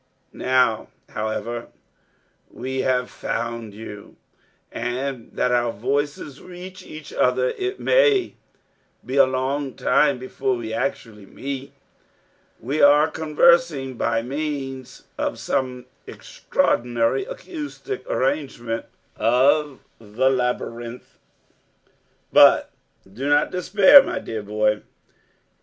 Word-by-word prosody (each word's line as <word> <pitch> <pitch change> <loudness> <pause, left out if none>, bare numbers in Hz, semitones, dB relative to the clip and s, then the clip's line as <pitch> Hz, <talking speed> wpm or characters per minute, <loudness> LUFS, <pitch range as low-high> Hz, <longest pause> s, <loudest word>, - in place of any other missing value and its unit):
Now, 125 -4 +1 0.2
however, 110 +2 -3
that 120 - -14 0.8
we 130 +1 -5
have 125 -1 +1
found 115 -2 -4
you, 105 -2 -10 0.6
and 125 +1 -4
that 125 - 0
our 120 -1 +2
voices 140 +5 -3
reach 185 +1 -10
each 155 -3 -10
other, 125 0 +2
it 380 +1 -4
may 440 -7 +3 0.7
be 130 +2 -3
a 135 - +7
long 130 +1 -2
time 140 -3 +2
before 130 +1 -2
we 115 -2 -5
actually 110 -5 -4
meet. 135 +3 -6 0.9
We 140 +6 -2
are 145 +2 +6
conversing 160 -3 +2
by 115 -1 -1
means 135 -1 -5 0.2
of - - -1
some 125 -2 -2 0.2
extraordinary 120 - 0
acoustic 400 -4 -7
arrangement 130 -4 -2 0.3
of 135 +5 +2 0.2
the 115 +5 0
labyrinth. 125 -1 -3 1.2
But - - +6 0.4
do 135 +7 -3
not 145 0 +3
despair, 200 +9 +7
my - - -4
dear 110 -1 -5
boy. 105 +1 0
130 Hz, 105 wpm, -22 LUFS, 120-150 Hz, 1.2 s, a